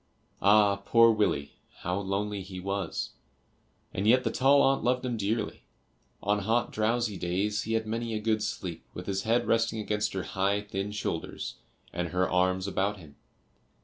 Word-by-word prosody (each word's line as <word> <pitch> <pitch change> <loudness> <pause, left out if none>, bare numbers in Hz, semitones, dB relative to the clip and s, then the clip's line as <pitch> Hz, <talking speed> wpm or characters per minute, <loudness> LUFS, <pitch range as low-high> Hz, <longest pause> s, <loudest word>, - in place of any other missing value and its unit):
Ah, 100 0 +5
poor 115 +3 +5
Willie, 105 -10 0 0.3
how 90 +2 -1
lonely 100 +1 -2
he 95 0 -8
was, 100 -1 -3 0.8
and 100 +3 -1
yet 130 +3 +5
the - - 0
tall 140 +2 +5
aunt 135 0 +3
loved 125 +1 +1
him 125 -2 -1
dearly. 105 +1 -2 0.6
On 105 +1 +2
hot 115 +4 +1
drowsy 110 -1 0
days 95 +5 -1
he 110 - -2
had 110 0 +1
many 115 +1 -2
a - - -1
good 110 0 +1
sleep 90 -5 -4
with 90 - -6
his 95 0 -1
head 120 +1 +3
resting 115 0 +1
against 105 -1 -1
her 95 -2 -2
high 95 +5 0
thin 100 0 -4
shoulders, 105 -5 -4 0.4
and 90 0 -1
her 90 +2 +1
arms 95 +1 +1
about 100 +1 0
him. 75 -6 -14
105 Hz, 170 wpm, -29 LUFS, 95-115 Hz, 0.8 s, Ah